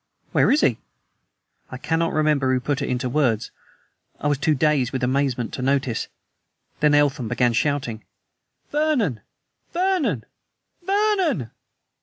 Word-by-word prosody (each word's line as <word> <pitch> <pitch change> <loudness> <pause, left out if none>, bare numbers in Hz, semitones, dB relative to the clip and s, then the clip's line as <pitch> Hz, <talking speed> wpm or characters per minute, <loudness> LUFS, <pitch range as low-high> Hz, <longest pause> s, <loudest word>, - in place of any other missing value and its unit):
"Where - - +3
is 290 +2 +4
he?" 120 -4 +2 0.9
I 130 - -7
cannot 165 +4 0
remember 150 -4 +2
who 130 - +2
put 140 +3 -2
it - - -2
into 125 +1 -1
words; 125 -4 0 0.7
I - - -8
was 145 -2 +1
too 155 +1 +2
dazed 145 -3 +2
with 130 -2 -3
amazement 130 -2 0
to - - -4
notice. 130 -3 0 0.7
Then 150 -1 +4
Eltham 140 -5 +2
began 120 +2 +1
shouting: 130 -4 -1 0.7
"Vernon! 275 - +1 0.5
Vernon! 340 - 0 0.6
VERNON!" 385 - +1
140 Hz, 130 wpm, -23 LUFS, 125-165 Hz, 0.9 s, is